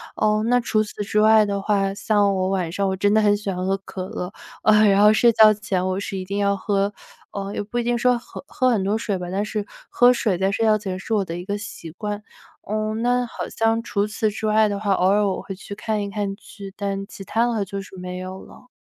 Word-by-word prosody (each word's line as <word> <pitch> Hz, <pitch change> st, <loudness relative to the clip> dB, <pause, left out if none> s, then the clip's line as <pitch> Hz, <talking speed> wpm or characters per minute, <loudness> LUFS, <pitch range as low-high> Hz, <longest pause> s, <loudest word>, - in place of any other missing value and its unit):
哦， 215 Hz, 0 st, +2 dB
那 245 Hz, +1 st, +4 dB
除 215 Hz, -2 st, +1 dB
此 210 Hz, 0 st, -6 dB
之 210 Hz, +1 st, +1 dB
外 220 Hz, 0 st, +6 dB
的 200 Hz, -1 st, -2 dB
话， 195 Hz, -1 st, +1 dB
像 205 Hz, -1 st, +2 dB
我 185 Hz, 0 st, 0 dB
晚 180 Hz, -4 st, -1 dB
上 195 Hz, +2 st, 0 dB
我 190 Hz, -, -1 dB
真 205 Hz, +2 st, +2 dB
的 220 Hz, -, +4 dB
很 205 Hz, -1 st, +3 dB
喜 205 Hz, -1 st, -4 dB
欢 180 Hz, -1 st, -3 dB
喝 195 Hz, 0 st, +1 dB
可 185 Hz, -1 st, -6 dB
乐， 180 Hz, +2 st, -5 dB, 0.3 s
呃， 215 Hz, 0 st, +5 dB
然 200 Hz, 0 st, +4 dB
后 210 Hz, -, +7 dB
睡 235 Hz, +2 st, +5 dB
觉 215 Hz, -1 st, +7 dB
前 195 Hz, -4 st, -2 dB
我 185 Hz, +1 st, -1 dB
是 200 Hz, -1 st, -4 dB
一 185 Hz, -, -4 dB
定 200 Hz, +2 st, -4 dB
要 200 Hz, 0 st, +2 dB
喝 200 Hz, +1 st, 0 dB, 0.4 s
呃， 200 Hz, 0 st, -5 dB
也 -, -, -2 dB
不 215 Hz, +4 st, -6 dB
一 240 Hz, -, 0 dB
定 240 Hz, 0 st, +1 dB
说 250 Hz, +1 st, +3 dB
喝 240 Hz, -, -10 dB
喝 255 Hz, -4 st, +1 dB
很 225 Hz, -6 st, +2 dB
多 205 Hz, +3 st, +1 dB
水 205 Hz, -3 st, -2 dB
吧， 180 Hz, -1 st, -6 dB
但 200 Hz, +2 st, 0 dB
是 210 Hz, -1 st, -3 dB, 0.2 s
喝 245 Hz, 0 st, +5 dB
水 210 Hz, -7 st, 0 dB
在 190 Hz, +1 st, +1 dB
睡 225 Hz, +3 st, 0 dB
觉 215 Hz, -1 st, +4 dB
前 190 Hz, -3 st, -4 dB
是 225 Hz, -, -4 dB
我 205 Hz, -3 st, +2 dB
的 165 Hz, -, -5 dB
一 175 Hz, -, -6 dB
个 205 Hz, +1 st, -2 dB
习 185 Hz, -6 st, -8 dB
惯。 210 Hz, +4 st, -5 dB, 0.5 s
嗯， 215 Hz, +1 st, -1 dB
那 245 Hz, +1 st, +2 dB
好 235 Hz, -, -6 dB
像 225 Hz, 0 st, +1 dB
除 205 Hz, -2 st, -1 dB
此 215 Hz, 0 st, -1 dB
之 215 Hz, +1 st, -3 dB
外 215 Hz, 0 st, +4 dB
的 200 Hz, -1 st, -3 dB
话， 200 Hz, -2 st, +1 dB
偶 185 Hz, -, +2 dB
尔 205 Hz, 0 st, +3 dB
我 190 Hz, -, -2 dB
会 195 Hz, 0 st, -7 dB
去 200 Hz, +1 st, -9 dB
看 215 Hz, 0 st, -2 dB
一 200 Hz, -, -3 dB
看 200 Hz, -1 st, -2 dB
剧， 200 Hz, -3 st, -11 dB
但 195 Hz, -1 st, -3 dB
其 195 Hz, -, -10 dB
他 230 Hz, +5 st, +1 dB
的 210 Hz, -3 st, -1 dB
就 195 Hz, +1 st, -5 dB
是 190 Hz, -1 st, -12 dB
没 180 Hz, 0 st, -6 dB
有 185 Hz, +1 st, -7 dB
了。 250 Hz, -, -16 dB
205 Hz, 280 characters per minute, -22 LUFS, 195-215 Hz, 0.5 s, 后